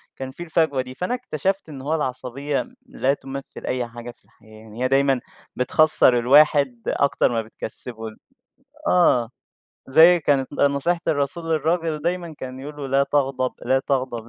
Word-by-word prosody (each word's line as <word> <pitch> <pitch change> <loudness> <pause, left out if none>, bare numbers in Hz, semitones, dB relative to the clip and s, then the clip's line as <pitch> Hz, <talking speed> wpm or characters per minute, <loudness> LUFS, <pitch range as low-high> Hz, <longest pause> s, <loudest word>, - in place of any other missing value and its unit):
كان 130 0 -6
في 170 - -8
الفجوة 160 -5 +1
دي، 130 0 -9
فأنا 180 - -2
اكتشَفت 195 - -3
إن 140 -3 -8
هو 150 +4 -1
العصبية 135 - -3 0.2
لا 140 - 0
تمثِّل 135 -1 -8
أي 125 -1 -2
حاجة 120 +1 -9
في 120 - -27
الحياة 110 -1 -19
يعني، 110 +2 -7
هي - - +3
دايمًا 135 0 +2 0.4
بتخسِّر 125 -1 +4
الواحد 140 -1 +4
أكتَر 140 -3 +1
ما 115 -1 0
بتكسِّبه. 110 +1 -6
ال 110 - -11 0.7
آه، 125 - +3 0.6
زي 165 +6 +6
كانت 140 -3 0
نصيحة 145 +5 +1
الرسول 145 +3 -1
للراجل، 160 -1 0
دايمًا 170 -1 -3
كان 130 0 -7
يقول 145 +2 -8
له: 145 -2 -5
"لا 135 +1 +3
تغضَب، 135 -3 0
لا 130 +2 +2
تغضَب، 130 -4 -3
135 Hz, 160 wpm, -22 LUFS, 125-155 Hz, 0.7 s, زي